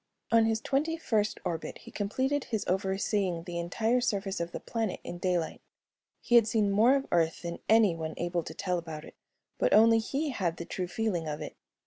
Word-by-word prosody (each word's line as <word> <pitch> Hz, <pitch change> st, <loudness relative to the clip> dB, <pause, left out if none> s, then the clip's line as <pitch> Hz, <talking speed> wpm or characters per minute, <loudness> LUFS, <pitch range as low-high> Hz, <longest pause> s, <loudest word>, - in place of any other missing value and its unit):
On 230 Hz, -1 st, +5 dB
his 225 Hz, 0 st, +1 dB
twenty 305 Hz, +4 st, 0 dB
first 215 Hz, -9 st, 0 dB
orbit 165 Hz, -2 st, -3 dB
he -, -, -12 dB
completed 260 Hz, +7 st, -1 dB
his 220 Hz, -3 st, -2 dB
overseeing 190 Hz, -1 st, 0 dB
the 170 Hz, 0 st, -4 dB
entire 220 Hz, +8 st, +1 dB
surface 200 Hz, -4 st, -1 dB
of 170 Hz, 0 st, -3 dB
the -, -, -5 dB
planet 225 Hz, -4 st, -3 dB
in 175 Hz, -, -7 dB
daylight. 175 Hz, -3 st, -1 dB, 0.6 s
He -, -, -3 dB
had 235 Hz, -2 st, +7 dB
seen 215 Hz, -3 st, +2 dB
more 225 Hz, +7 st, +5 dB
of 275 Hz, -1 st, 0 dB
Earth 165 Hz, 0 st, +1 dB
than 170 Hz, 0 st, -4 dB
anyone 170 Hz, -8 st, +3 dB
able 175 Hz, 0 st, -1 dB
to 160 Hz, -, -7 dB
tell 180 Hz, -2 st, -1 dB
about 160 Hz, -2 st, -7 dB
it, -, -, -12 dB, 0.5 s
but -, -, +4 dB
only 225 Hz, +1 st, +6 dB
he 275 Hz, +7 st, -2 dB
had 175 Hz, -8 st, -1 dB
the 170 Hz, -, -6 dB
true 180 Hz, +1 st, -3 dB
feeling 180 Hz, -4 st, -1 dB
of 150 Hz, -1 st, -3 dB
it. -, -, -7 dB
200 Hz, 195 wpm, -29 LUFS, 175-225 Hz, 0.6 s, had